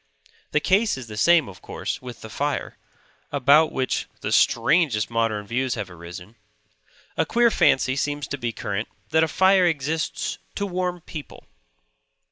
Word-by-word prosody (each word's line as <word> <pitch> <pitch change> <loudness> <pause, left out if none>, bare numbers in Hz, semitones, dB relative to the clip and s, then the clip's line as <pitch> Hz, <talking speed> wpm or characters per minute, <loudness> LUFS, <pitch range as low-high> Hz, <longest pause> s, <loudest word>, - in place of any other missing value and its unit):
The - - +2
case 200 -2 +2
is 130 - -7
the 110 -2 -9
same, 165 +6 +4
of 95 - -12
course, - - -5
with 125 -2 -9
the 110 - -9
fire; 145 +4 -2 0.6
about 145 +3 +4
which 130 -1 -1
the - - -3
strangest 145 -11 +3
modern 115 -3 0
views 125 +3 -1
have 95 - -5
arisen. 90 +5 -10 0.8
A - - +3
queer 235 0 +3
fancy 130 -8 +3
seems 145 +1 -2
to 145 - -4
be 120 -1 -2
current 105 0 -3 0.2
that 160 +1 +4
a - - +2
fire 190 +1 +4
exists 155 0 -2 0.2
to 200 - -1
warm 180 -2 -2
people. 155 -2 -9
140 Hz, 155 wpm, -24 LUFS, 115-170 Hz, 0.8 s, same